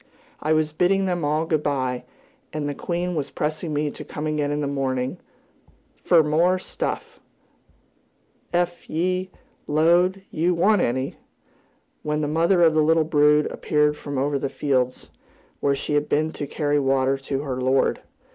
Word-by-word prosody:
I 155 Hz, -, -1 dB
was 155 Hz, -1 st, +2 dB
bidding 190 Hz, +4 st, +2 dB
them 175 Hz, -3 st, -1 dB
all 155 Hz, +2 st, +1 dB
good 155 Hz, -2 st, 0 dB
bye, 130 Hz, -4 st, -1 dB, 0.5 s
and 150 Hz, -1 st, -3 dB
the 145 Hz, -, -2 dB
queen 175 Hz, +4 st, -3 dB
was 145 Hz, -4 st, -2 dB
pressing 155 Hz, +3 st, -3 dB
me 150 Hz, 0 st, -1 dB
to -, -, -9 dB
come 150 Hz, -, -6 dB
again 150 Hz, -1 st, 0 dB
in 145 Hz, 0 st, -1 dB
the 145 Hz, -, -1 dB
morning 135 Hz, +2 st, -2 dB, 0.8 s
"fer 170 Hz, -3 st, +5 dB
more 165 Hz, +5 st, +2 dB
stuff, 185 Hz, -, -5 dB, 1.3 s
ef 175 Hz, 0 st, -1 dB
ye 185 Hz, +3 st, -1 dB, 0.4 s
'lowed 175 Hz, +5 st, +3 dB
yew 175 Hz, +3 st, +1 dB
wanted 195 Hz, +3 st, +3 dB
any," 130 Hz, +3 st, -3 dB, 0.8 s
when 150 Hz, 0 st, -1 dB
the 150 Hz, -, -1 dB
mother 170 Hz, +4 st, +3 dB
of 160 Hz, -1 st, +5 dB
the 155 Hz, -, +3 dB
little 160 Hz, +1 st, +4 dB
brood 150 Hz, -1 st, +4 dB
appeared 150 Hz, 0 st, +1 dB
from 145 Hz, -2 st, -6 dB
over 140 Hz, +1 st, 0 dB
the 135 Hz, -, -2 dB
fields, 130 Hz, -3 st, -1 dB, 0.5 s
where 140 Hz, 0 st, +1 dB
she 145 Hz, +2 st, -3 dB
had 145 Hz, 0 st, +1 dB
been 155 Hz, +2 st, +1 dB
to 145 Hz, -, -5 dB
carry 145 Hz, -1 st, 0 dB
water 135 Hz, -1 st, +2 dB
to 135 Hz, 0 st, -3 dB
her 130 Hz, -3 st, -3 dB
lord. 130 Hz, +1 st, +2 dB
150 Hz, 165 wpm, -23 LUFS, 140-170 Hz, 1.3 s, fer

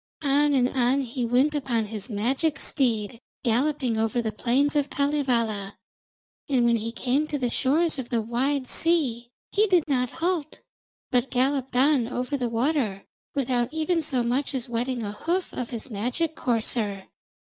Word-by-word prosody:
On 290 Hz, +1 st, +3 dB
and 250 Hz, -2 st, +4 dB
on 260 Hz, +1 st, +2 dB
he 245 Hz, -1 st, -3 dB
went 260 Hz, +6 st, +3 dB
upon 250 Hz, -6 st, 0 dB
his 210 Hz, +2 st, -6 dB
magic 265 Hz, +9 st, 0 dB
steed, 230 Hz, -4 st, 0 dB, 0.2 s
galloping 250 Hz, -1 st, +1 dB
over 225 Hz, +2 st, 0 dB
the 225 Hz, -2 st, -1 dB
plains 260 Hz, +7 st, +1 dB
of 290 Hz, -1 st, +1 dB
Kalevala. 235 Hz, -9 st, 0 dB, 0.7 s
And 255 Hz, -4 st, +3 dB
when 235 Hz, -1 st, +4 dB
he 225 Hz, +1 st, -4 dB
came 265 Hz, +5 st, 0 dB
to 300 Hz, -, -2 dB
the 250 Hz, -3 st, -1 dB
shores 305 Hz, +4 st, +1 dB
of 245 Hz, -, -5 dB
the 235 Hz, -, +1 dB
wide 255 Hz, +4 st, 0 dB
sea, 260 Hz, -9 st, 0 dB, 0.2 s
he 425 Hz, +1 st, +3 dB
did 360 Hz, -4 st, +4 dB
not 250 Hz, -4 st, +1 dB
halt, 330 Hz, -1 st, -2 dB, 0.5 s
but 250 Hz, 0 st, +2 dB
galloped 265 Hz, +1 st, 0 dB
on 265 Hz, -2 st, +4 dB
over 250 Hz, +3 st, -2 dB
the 250 Hz, -3 st, -1 dB
water 230 Hz, -4 st, 0 dB, 0.3 s
without 250 Hz, -2 st, 0 dB
even 320 Hz, +2 st, 0 dB
so 265 Hz, -5 st, 0 dB
much 260 Hz, +4 st, 0 dB
as 255 Hz, -1 st, -3 dB
wetting 240 Hz, +1 st, -2 dB
a 205 Hz, -, -3 dB
hoof 345 Hz, -, -2 dB
of 245 Hz, -2 st, -4 dB
his 240 Hz, +2 st, -6 dB
magic 250 Hz, +10 st, -1 dB
courser. 220 Hz, -6 st, -1 dB
255 Hz, 165 wpm, -26 LUFS, 235-290 Hz, 0.7 s, and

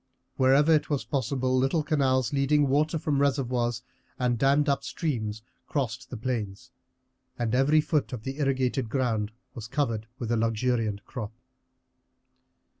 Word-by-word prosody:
Wherever 140 Hz, +4 st, +5 dB
it 155 Hz, -, +2 dB
was 145 Hz, -3 st, -1 dB
possible 130 Hz, -1 st, 0 dB
little 135 Hz, +5 st, +2 dB
canals 135 Hz, -3 st, +1 dB
leading 145 Hz, +1 st, +3 dB
water 150 Hz, +4 st, +2 dB
from 145 Hz, -2 st, 0 dB
reservoirs 125 Hz, -4 st, 0 dB, 0.3 s
and 125 Hz, -3 st, 0 dB
dammed 140 Hz, +3 st, +3 dB
up 140 Hz, -1 st, +1 dB
streams 115 Hz, -6 st, -3 dB, 0.2 s
crossed 125 Hz, -4 st, -3 dB
the 125 Hz, -, -6 dB
plains, 110 Hz, -5 st, -4 dB, 0.7 s
and 120 Hz, -1 st, -1 dB
every 140 Hz, +4 st, +4 dB
foot 150 Hz, -1 st, 0 dB
of 120 Hz, -4 st, -6 dB
the 135 Hz, +3 st, -5 dB
irrigated 130 Hz, -3 st, 0 dB
ground 115 Hz, -5 st, 0 dB, 0.2 s
was 110 Hz, -2 st, -7 dB
covered 115 Hz, -5 st, -1 dB
with 120 Hz, -3 st, -4 dB
a 120 Hz, -, +2 dB
luxuriant 115 Hz, -2 st, 0 dB
crop. 115 Hz, -4 st, -6 dB
130 Hz, 140 wpm, -27 LUFS, 115-140 Hz, 0.7 s, Wherever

